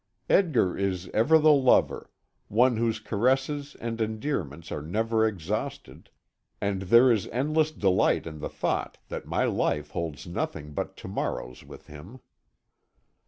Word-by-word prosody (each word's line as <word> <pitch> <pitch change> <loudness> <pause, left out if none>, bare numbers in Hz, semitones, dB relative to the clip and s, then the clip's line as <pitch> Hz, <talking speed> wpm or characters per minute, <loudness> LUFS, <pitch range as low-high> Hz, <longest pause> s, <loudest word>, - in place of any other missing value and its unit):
Edgar 150 - +3
is 95 -2 -2
ever 145 +9 +4
the 155 0 +5
lover, 135 -3 +3 0.4
one 120 +2 +3
whose 115 -1 0
caresses 135 +7 0
and 115 0 -4
endearments 110 - -3
are 75 - -3
never 110 +7 +1
exhausted, 105 - -5 0.5
and 100 -1 -1
there 115 +7 +6
is 110 -4 +1
endless 155 +5 +1
delight 95 -10 +2
in 80 -2 -7
the 75 - -4
thought - - -2
that - - -6
my - - 0
life 75 0 -1
holds 80 -4 -4
nothing 80 -3 -4
but - - -4
to - - -9
morrows 60 0 -4
with - - -13
him. 80 - -12
110 Hz, 140 wpm, -27 LUFS, 85-130 Hz, 0.5 s, there